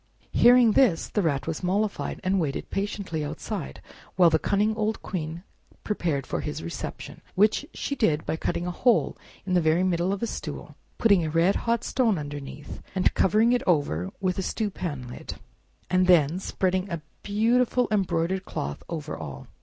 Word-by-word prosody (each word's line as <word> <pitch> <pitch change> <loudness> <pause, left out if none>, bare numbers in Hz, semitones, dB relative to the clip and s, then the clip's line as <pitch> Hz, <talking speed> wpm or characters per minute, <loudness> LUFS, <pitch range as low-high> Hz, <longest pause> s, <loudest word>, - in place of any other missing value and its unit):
Hearing 240 -1 +6
this, 215 -8 +3
the 210 - 0
Rat 140 -6 0
was 160 -1 -3
mollified, 200 +3 -1
and 190 +1 +2
waited 150 -5 -3
patiently 195 -5 -2
outside 65 - -5 0.3
while 175 -3 +6
the 160 - +3
cunning 210 +5 +1
old 215 0 -1
Queen 165 -2 -4 0.4
prepared 165 -10 -1
for - - -3
his 150 - -5
reception, 85 - -6
which 215 +8 +3
she 280 - -3
did 155 - +1
by - - -1
cutting 170 +1 -2
a 180 - -2
hole 240 +6 +2 0.3
in 185 - -1
the 180 - +4
very 160 +3 +3
middle 180 0 +1
of 200 +2 -3
a - - +3
stool, - - -6 0.2
putting 200 -7 +4
a 155 - -1
red 165 +5 +3
hot 235 0 0
stone 230 -7 +1
underneath, 145 -1 -7 0.3
covering 215 +6 +3
it 245 - +2
over 95 - +1
with 185 -1 -1
a - - +1
stew 210 +2 -2
pan 145 -10 -5
lid, 120 - -7 0.5
and 185 0 +2
then 170 -1 +4
spreading 185 0 -1
a 170 -3 -4 0.2
beautiful 235 +4 +2
embroidered 190 -2 0
cloth 70 - -5
over 155 -3 -4
all. 70 -5 -8
185 Hz, 170 wpm, -26 LUFS, 155-210 Hz, 0.5 s, Hearing